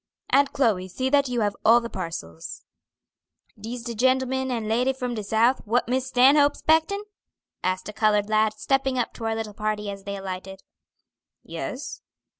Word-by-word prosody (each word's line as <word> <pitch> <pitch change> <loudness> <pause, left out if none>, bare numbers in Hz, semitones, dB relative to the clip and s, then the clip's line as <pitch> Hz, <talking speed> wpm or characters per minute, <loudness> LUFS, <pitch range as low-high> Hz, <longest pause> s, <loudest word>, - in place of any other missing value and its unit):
"Aunt 280 0 +4
Chloe, 215 -10 +1
see 260 +8 -2
that 280 -2 +3
you 245 -2 -1
have 205 -1 0
all 235 +2 +7
the 235 - -5
parcels." 165 - -7 0.9
"Dis 230 +3 -7
de 235 -1 -4
gentleman 260 +2 +1
and 230 -4 -2
lady 245 +4 +2
from 250 -2 -4
de 215 -2 -4
South, 225 +5 +2
what 230 +3 +1
Miss 260 +1 0
Stanhope's 275 +3 +5
'spectin'?" 320 +6 +2 0.6
asked 185 0 -1
a 210 - -6
colored 210 -1 +2
lad, 215 0 +2
stepping 270 +3 0
up 245 - -1
to 225 - -7
our 225 0 0
little 220 -2 -4
party 210 -1 -2
as 195 -1 -9
they 200 0 -4
alighted. 190 0 -7 0.8
"Yes." - - -6
230 Hz, 170 wpm, -25 LUFS, 210-260 Hz, 0.9 s, all